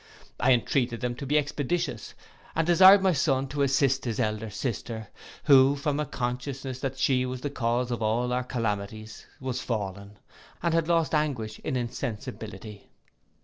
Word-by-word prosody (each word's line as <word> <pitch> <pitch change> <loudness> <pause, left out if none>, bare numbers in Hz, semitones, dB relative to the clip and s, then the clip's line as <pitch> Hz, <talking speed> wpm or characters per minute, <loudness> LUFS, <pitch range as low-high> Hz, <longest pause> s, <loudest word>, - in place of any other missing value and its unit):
I 130 - +4
entreated 120 0 0
them 125 -1 -1
to 140 - -6
be 150 +3 +3
expeditious, 150 +3 -2 0.4
and 160 - +1
desired 190 +3 +8
my 190 -2 +4
son 135 -2 +1
to 145 +1 -2
assist 135 -1 +2
his 115 -1 -2
elder 110 -2 -1
sister, 110 0 -4 0.3
who, 135 -1 +6
from 145 +1 -1
a 150 - -1
consciousness 130 +1 -4
that 135 -1 -3
she 130 -1 +2
was 130 0 -4
the 145 - -3
cause 120 -1 -1
of 120 - -3
all 120 +3 0
our 125 0 0
calamities, 110 -3 -4
was 130 -1 -3
fallen, 100 -2 -4 0.5
and 170 -1 +1
had 165 -1 +1
lost 165 -4 +2
anguish 130 -9 -1
in - - -3
insensibility. 110 -4 -6
125 Hz, 160 wpm, -27 LUFS, 115-140 Hz, 0.5 s, desired